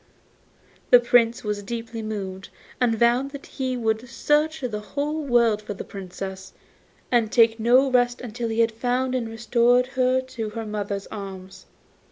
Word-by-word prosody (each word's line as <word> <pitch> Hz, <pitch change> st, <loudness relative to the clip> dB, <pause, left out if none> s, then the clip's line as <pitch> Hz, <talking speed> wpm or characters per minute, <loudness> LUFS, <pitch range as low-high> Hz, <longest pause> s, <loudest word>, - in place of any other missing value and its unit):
The 245 Hz, -, +9 dB
Prince 240 Hz, 0 st, +3 dB
was 210 Hz, -1 st, -2 dB
deeply 230 Hz, +2 st, -5 dB
moved, 195 Hz, -3 st, -5 dB, 0.3 s
and 240 Hz, -3 st, +2 dB
vowed 240 Hz, +4 st, +3 dB
that 280 Hz, -1 st, -9 dB
he 260 Hz, -2 st, -3 dB
would 225 Hz, +1 st, -1 dB
search 305 Hz, +3 st, +1 dB
the 215 Hz, -5 st, -4 dB, 0.4 s
world 235 Hz, -4 st, +3 dB
for 210 Hz, -1 st, -6 dB
the -, -, -6 dB
Princess, 190 Hz, 0 st, -8 dB, 0.6 s
and 230 Hz, -3 st, +2 dB
take 225 Hz, -1 st, +4 dB
no 250 Hz, +4 st, +4 dB
rest 245 Hz, -1 st, +2 dB
till 235 Hz, 0 st, -3 dB
he 225 Hz, +1 st, +1 dB
had 230 Hz, 0 st, +3 dB
found 250 Hz, +3 st, -1 dB
and 240 Hz, -3 st, -2 dB
restored 240 Hz, +2 st, +2 dB
her 255 Hz, 0 st, +2 dB
to 250 Hz, -4 st, -5 dB
her 225 Hz, +1 st, -6 dB
mother's 205 Hz, -2 st, -4 dB
arms. 190 Hz, -2 st, -8 dB
230 Hz, 155 wpm, -24 LUFS, 210-250 Hz, 0.6 s, The